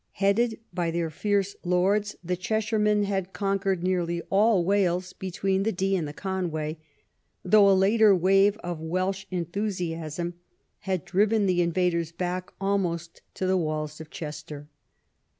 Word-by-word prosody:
Headed 220 +4 +1
by 175 -1 -1
their 165 -1 -2
fierce 200 +3 0
lords, 195 +4 +1
the 180 +1 -1
Cheshiremen 210 +2 +1
had 195 -2 -2
conquered 195 -2 -1
nearly 175 -2 0
all 200 -2 +4
Wales 185 -2 +1
between 190 +1 -1
the 220 +3 +1
Dee 195 +1 0
and 165 -5 -1
the - - -5
Conway, 165 -3 -3 0.7
though 200 +2 +6
a 195 - +6
later 205 +1 +5
wave 195 +3 +4
of 175 -2 -4
Welsh 185 +4 -2
enthusiasm 175 -3 -3 0.6
had 185 -3 -1
driven 205 +3 +2
the 180 -2 +2
invaders 170 -1 0
back 180 +1 -3
almost 180 -4 -1
to 190 - -2
the 185 0 +2
walls 155 -2 -3
of 155 - -10
Chester. 150 -2 -7
185 Hz, 140 wpm, -26 LUFS, 170-200 Hz, 0.7 s, though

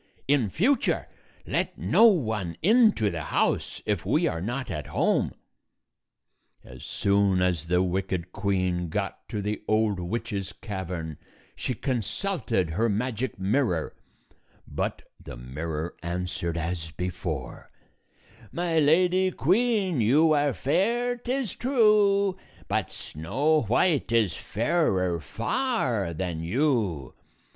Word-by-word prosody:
In 135 -7 +3
future 235 - +1 0.4
let - - -1
no 230 - +4
one 110 - 0
into 215 - +4
the 85 -2 -4
house, - - -1
if - - -1
we - - +2
are 85 - -1
not 120 +4 -3
at 75 -6 -5
home." - - +1 1.3
As 65 +1 -12
soon 100 -2 +2
as 90 -3 0
the 90 +1 +3
wicked 90 -1 -2
queen 90 -3 -1
got - - -4
to 105 - -3
the 105 +1 -2
old 110 -2 +2
238 85 -1 -5
witch's 105 -3 -3
cavern, 90 -7 -5 0.4
she 125 - -3
consulted 125 - -1
her 110 +8 +1
magic 120 +3 -2
mirror, 95 - 0 0.7
but - - -3 0.2
the - - -8
mirror 75 +6 -5
answered 85 -1 -3
as 85 0 -3
before, 80 -5 -5 0.8
"My 170 -2 0
Lady 180 +5 +4
Queen, 190 - +1
you 150 +9 +4
are 145 -2 +2
fair, 235 - +1
't 240 +1 -5
is 260 -7 -1
true; 210 -6 +3 0.3
But - - -1
Snow 135 - 0
White 140 - +2
is 110 -7 +3
fairer 95 - 0
far 120 - 0
than 85 -1 -3
you. 100 - 0
110 Hz, 120 wpm, -26 LUFS, -, 1.3 s, no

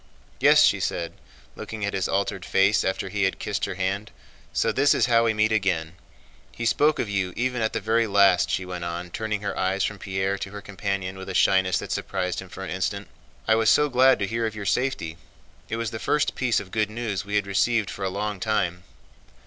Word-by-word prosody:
"Yes," - - +6
she - - +3
said, 85 -1 -2 0.4
looking 110 -2 -5
at 100 - -3
his 95 - 0
altered 95 -1 -1
face 95 +3 +3
after 95 +1 -2
he 100 +2 -3
had 95 - 0
kissed 105 -1 -2
her - - -5
hand, 100 +3 -2 0.4
"so - - +1
this - - +3
is - - +3
how 115 -1 +3
we 115 - +3
meet 110 +1 +2
again. 90 -7 0 0.6
He 115 - -5
spoke 150 +6 +3
of - - -1
you 95 -3 -1
even 125 0 -1
at 110 - 0
the - - 0
very 115 +2 +1
last," 100 -3 +4
she 95 - -1
went 90 -1 -6
on, 85 +1 -5
turning 110 0 -3
her 100 -1 -3
eyes 95 +1 0
from 105 -2 -2
Pierre 95 0 -2
to 100 - -5
her 105 +1 -8
companion 95 -1 -4
with 95 - -8
a 95 - -4
shyness 95 -2 +3
that - - -5
surprised 90 -2 -2
him 95 - -12
for 95 - -8
an 95 - -5
instant. 100 +2 -3 0.4
"I 110 - +5
was 110 0 +3
so 150 +4 +4
glad 130 0 +5
to 100 - -1
hear 115 +1 -1
of 110 - -6
your 105 -1 -6
safety. 100 -8 -1 0.5
It 115 - -2
was 115 -1 -2
the 110 - -5
first 150 +5 +1
piece 120 -4 +1
of 95 - -10
good 110 -1 0
news 110 -3 -3
we 100 +1 -4
had 105 -1 +2
received 105 +2 +1
for 100 - -6
a 95 - 0
long 100 +1 -3
time." 90 -4 -1
100 Hz, 230 wpm, -25 LUFS, 95-110 Hz, 0.6 s, Yes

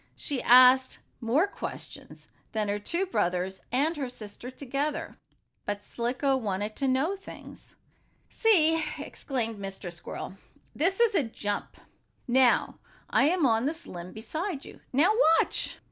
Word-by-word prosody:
She 280 -4 -2
asked 255 +1 +6 0.2
more 255 +9 +2
questions 405 - -8 0.3
than 215 -2 0
her 205 +1 -1
two 345 - -1
brothers 185 - -1
and 290 +7 +2
her 270 -3 -3
sister 235 0 -9
together. 280 +3 -3 0.5
But 205 0 -4
Slicko 250 +3 0
wanted 210 -2 -3
to 275 - 0
know 265 +7 +2
about 395 -1 -6
things. - - -12 0.5
"See!" 325 -8 +3
exclaimed 250 -6 -4
Mr. 195 -2 -6
Squirrel. 180 +2 -7 0.4
"This 375 +7 +1
is 470 -3 +4
a 355 - +4
jump. 210 -4 -4 0.5
Now 250 0 +3 0.3
I - - +4
am 350 -3 +2
on 230 +1 +3
this 325 +2 -4
limb 175 +1 -8
beside 305 - -4
you. - - -12
Now 300 +10 +4 0.3
watch!" - - 0
260 Hz, 140 wpm, -28 LUFS, 215-310 Hz, 0.5 s, asked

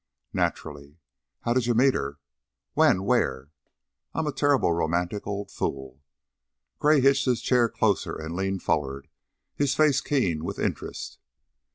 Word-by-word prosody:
"Naturally. 75 0 -3 0.4
How 120 - 0
did 125 -1 +1
you 120 - +2
meet 130 +3 +5
her? 70 +1 -3 0.6
When? 95 - +4
Where? 65 -7 0 0.6
I'm - - 0
a 150 - 0
terribly 140 -7 +2
romantic 85 +5 -1
old 100 -1 -4
fool." 65 0 -4 0.8
Gray 150 -1 +4
hitched 135 +1 +4
his 125 -3 +1
chair 120 0 +2
closer 105 -3 0
and 80 +2 -6
leaned 95 0 -2
forward, 70 -3 -1 0.4
his 145 -1 0
face 150 -3 +3
keen 95 - 0
with - - -4
interest. - - -4
100 Hz, 140 wpm, -26 LUFS, 80-130 Hz, 0.8 s, meet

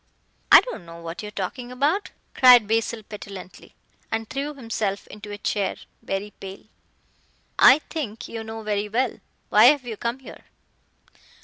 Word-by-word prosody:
"I - - +11
don't 335 - -8
know 170 0 -10
what 170 +1 -7
you 210 - -7
are - - -8
talking 240 +5 -5
about," 295 +11 0 0.2
cried 245 -4 +7
Basil 225 0 -1
petulantly, 200 -3 -11 0.4
and 225 0 -2
threw 285 +4 -4
himself 220 -6 -3
into 210 0 -11
a 205 - -5
chair, 205 -1 -1 0.3
very 195 +2 -4
pale. 195 0 -9 1.0
"I 265 - +9
think 240 -9 -5
you 225 -1 -6
know 220 0 -7
very 210 0 -2
well. 245 +5 -1 0.3
Why - - +6
have 290 -4 +5
you 225 -3 -5
come 235 +3 -2
here?" 265 - -13
220 Hz, 155 wpm, -24 LUFS, 205-250 Hz, 1.0 s, I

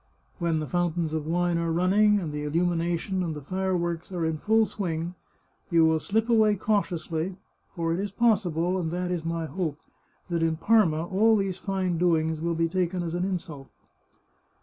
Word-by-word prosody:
When 170 -2 +1
the 155 - -3
fountains 170 -1 -1
of 155 -1 -2
wine 175 0 +1
are 165 0 -1
running, 205 +5 +3
and 160 -6 -4
the 150 0 -3
illumination 170 +3 0
and 165 -3 -2
the 150 - -7
fireworks 175 0 -2
are 175 -3 -1
in 160 -1 -1
full 220 +5 +3
swing, 175 -4 -3 0.6
you 165 -2 +5
will 160 0 +3
slip 220 +7 0
away 220 -3 +4
cautiously, 180 -4 -1 0.4
for 165 -2 0
it 170 - -2
is 200 0 -3
possible, 190 -6 +1
and 165 -3 -2
that 180 +1 -2
is 175 -3 -2
my 165 0 -2
hope, 160 -3 -3 0.5
that 170 -1 0
in 165 -1 +1
Parma 170 -5 +3
all 215 +5 +3
these 195 -2 -2
fine 185 -4 -1
doings 160 -3 +1
will 170 0 -1
be 165 0 +1
taken 180 +1 -1
as 165 -1 -4
an 175 +1 -1
insult." 165 -7 -5
175 Hz, 180 wpm, -26 LUFS, 165-190 Hz, 0.6 s, you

